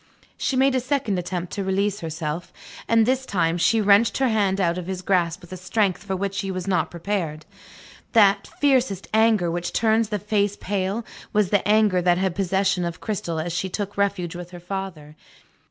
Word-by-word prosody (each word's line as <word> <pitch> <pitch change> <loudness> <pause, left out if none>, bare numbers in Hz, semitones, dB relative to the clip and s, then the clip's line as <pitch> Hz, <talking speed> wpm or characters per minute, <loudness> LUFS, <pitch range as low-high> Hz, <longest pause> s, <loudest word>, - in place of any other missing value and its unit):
She 270 - -1
made 265 +1 +3
a 260 - +2
second 255 -6 -1
attempt 180 0 -4
to 200 - -2
release 200 +2 0
herself; 160 0 -4 0.4
and 230 -1 +4
this 260 +2 +1
time, 175 -7 0
she 225 +6 +3
wrenched 205 +1 +4
her 265 -2 +2
hand 200 -3 +1
out 175 -1 +1
of 180 - -7
his 185 -1 -4
grasp 175 -3 +1
with 175 +1 -11
a - - -6
strength 185 -1 0
for 195 -1 -3
which 195 +1 -2
he 195 - -4
was 185 -1 -4
not 185 -2 +1
prepared. 170 -4 -3 0.7
That 200 -3 +5
fiercest 255 -9 +2
anger 220 -6 +3
which 175 +1 -3
turns 220 -1 +2
the 210 - -1
face 205 0 0
pale, 200 +3 -2 0.3
was 210 -3 +2
the 205 - +3
anger 210 -3 +4
that 175 0 +3
had 190 -1 0
possession 190 -1 +1
of 170 -1 -4
Cristel 175 -6 -3
as 165 +1 -3
she 185 +2 -2
took 205 +1 -4
refuge 195 -3 -1
with 175 0 -7
her 175 -1 -10
father. 175 -5 -6
195 Hz, 195 wpm, -23 LUFS, 175-210 Hz, 0.7 s, That